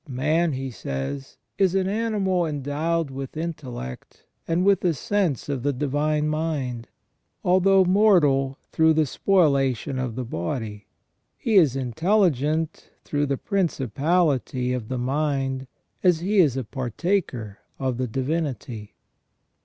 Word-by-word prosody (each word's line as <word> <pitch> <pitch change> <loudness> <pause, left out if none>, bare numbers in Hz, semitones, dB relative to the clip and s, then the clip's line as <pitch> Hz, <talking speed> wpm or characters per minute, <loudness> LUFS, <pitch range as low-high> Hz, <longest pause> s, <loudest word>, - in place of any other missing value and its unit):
" 160 - -22 0.2
Man," 160 +1 +2
he 135 0 -4
says, 70 - -5
" - - -53
is 190 -2 +3
an 190 -1 +2
animal 200 -4 0
endowed 150 +2 -1
with 135 +2 -6
intellect, 135 - -6 0.2
and 170 +3 +1
with 200 -2 +4
a 175 -3 +2
sense 180 - -1
of 140 -3 -2
the 145 +3 +1
divine 150 +3 0
mind, 150 -7 -2 0.6
although 190 0 +4
mortal 160 -9 +4
through 160 0 +4
the 155 -1 +3
spoliation 140 - +1
of 125 -4 -3
the 130 0 -3
body. 105 +2 -4 0.5
He 230 - -2
is 160 - +5
intelligent 155 - +1
through 145 0 -1
the 135 -1 0
principality 145 - 0
of 120 -4 -4
the 130 - -3
mind 135 0 -1 0.3
as 175 -3 +3
he 200 +3 +2
is 145 -8 +4
a 130 - -1
partaker 125 - -2 0.2
of 130 -3 -2
the 130 0 -1
Divinity." 130 -4 -3
145 Hz, 135 wpm, -24 LUFS, 130-175 Hz, 0.6 s, is